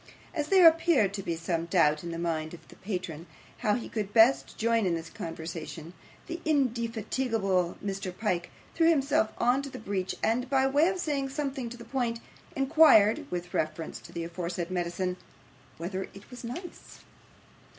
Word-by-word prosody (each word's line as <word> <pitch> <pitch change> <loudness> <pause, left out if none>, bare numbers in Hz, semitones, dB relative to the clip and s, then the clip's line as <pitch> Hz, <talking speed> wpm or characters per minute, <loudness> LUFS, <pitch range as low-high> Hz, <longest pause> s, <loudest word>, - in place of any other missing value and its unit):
As 300 -3 -2
there 370 -2 +8
appeared 320 - +4
to 200 - -3
be 170 -3 -2
some 165 0 -2
doubt 155 -4 +3
in 170 - -5
the 165 - -4
mind 165 -1 -2
of - - -13
his - - -15
patron 180 -5 -5 0.3
how 210 -4 +2
he 240 - -4
could 210 -1 -4
best 230 +4 +5
join 230 -2 +2
in 170 - +1
this 165 0 -6
conversation, 165 -2 -7 0.3
the 340 0 -6
indefatigable 230 - 0
Mr. 195 -1 -3
Pyke 180 -6 -1 0.2
threw 330 0 +4
himself 275 -8 +2
into 265 +4 +2
the - - -8
breach, 195 -3 -3
and, 245 +3 +1
by 265 -1 +3
way 285 +4 +4
of 375 0 0
saying 285 -6 -1
something 270 -3 -3
to 240 - -9
the 235 - -11
point, 240 -4 -1 0.4
inquired 275 -2 +5
with 175 0 -5
reference 155 +1 -2
to - - -13
the 170 - -4
aforesaid 170 +1 -4
medicine 180 +1 -2 0.6
whether 185 +3 -4
it 200 +4 -14
was 250 - -9
nice. 340 +10 -8
215 Hz, 170 wpm, -29 LUFS, 175-270 Hz, 0.6 s, there